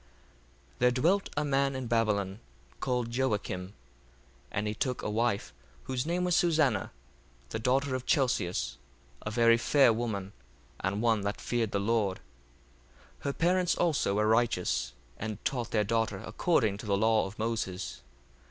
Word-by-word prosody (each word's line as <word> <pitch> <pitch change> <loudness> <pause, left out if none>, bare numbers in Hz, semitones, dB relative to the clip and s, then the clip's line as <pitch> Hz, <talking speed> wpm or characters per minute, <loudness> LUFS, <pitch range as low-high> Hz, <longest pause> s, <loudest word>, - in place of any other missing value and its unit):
1:1 - - -30
There 125 - +5
dwelt 170 +11 +2
a 150 - +1
man 135 -1 +1
in 130 -1 -3
Babylon, 105 -4 0 0.4
called 125 -3 -1
Joacim: 105 -7 -1
1:2 - - -16 0.8
And 105 - -1
he 105 - -1
took 125 +3 -2
a - - -2
wife, 115 -1 0 0.3
whose 130 +2 -2
name 175 +2 0
was 180 -1 +2
Susanna, 155 - +2 0.6
the - - -3
daughter 130 +4 +1
of 130 -1 -3
Chelcias, 90 - +1 0.4
a - - -4
very 115 +1 +5
fair 135 0 +4
woman, 105 -4 -3 0.5
and 100 +4 -1
one 115 -3 +3
that 100 +1 -3
feared 120 -3 -1
the 100 - 0
Lord. 105 -2 +1
1:3 - - -23 1.0
Her 140 - 0
parents 180 +2 +2
also 155 - +1
were 105 +1 +2
righteous, 110 - +1 0.3
and 110 -1 -4
taught 125 -3 -1
their 105 -2 +2
daughter 110 -1 0
according 110 - +1
to 105 - -8
the 100 -1 +2
law 110 0 +3
of 95 - -11
Moses. 110 -5 -3
115 Hz, 160 wpm, -30 LUFS, 105-130 Hz, 1.0 s, There